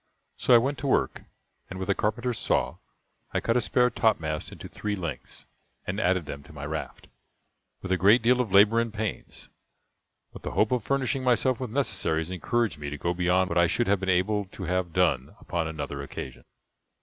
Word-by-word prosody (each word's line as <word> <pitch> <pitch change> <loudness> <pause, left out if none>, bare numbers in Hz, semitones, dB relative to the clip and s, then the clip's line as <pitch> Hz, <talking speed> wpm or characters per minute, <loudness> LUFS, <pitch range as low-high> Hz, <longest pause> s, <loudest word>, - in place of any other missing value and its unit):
So 125 - +4
I - - +10
went 135 +4 0
to 140 - -3
work, - - +1 0.5
and 95 - -7
with 95 - -4
a 100 - +3
carpenter's 115 +4 -1
saw - - 0 0.6
I - - +3
cut 115 - 0
a 125 - +3
spare 125 +2 +2
topmast 80 -9 0
into - - -9
three 105 -1 -3
lengths, 85 -9 -7 0.4
and 95 +3 -3
added 90 -4 +1
them 70 -1 -7
to 70 - -16
my 70 -1 -7
raft, 75 -3 -6 0.8
with 95 - -4
a 95 - +3
great 105 +5 +6
deal 125 +2 +4
of 115 -6 -4
labor 105 +4 +6
and 115 -1 -1
pains. 110 -1 -5 0.8
But - - -10
the - - -5
hope 110 - +3
of 125 -2 +1
furnishing 135 -1 0
myself 125 0 +2
with 130 -3 -4
necessaries 95 - 0
encouraged 100 0 -1
me 75 -1 -4
to 75 - -5
go 85 +4 -1
beyond 90 +1 +2
what 85 - +1
I 85 - +5
should 120 - 0
have 100 -2 +2
been 95 0 -3
able 100 +3 +1
to 95 0 -10
have 90 0 -1
done 80 -8 +1
upon 85 -2 -2
another 75 -3 -5
occasion. 70 - -8
95 Hz, 200 wpm, -27 LUFS, 85-115 Hz, 0.8 s, I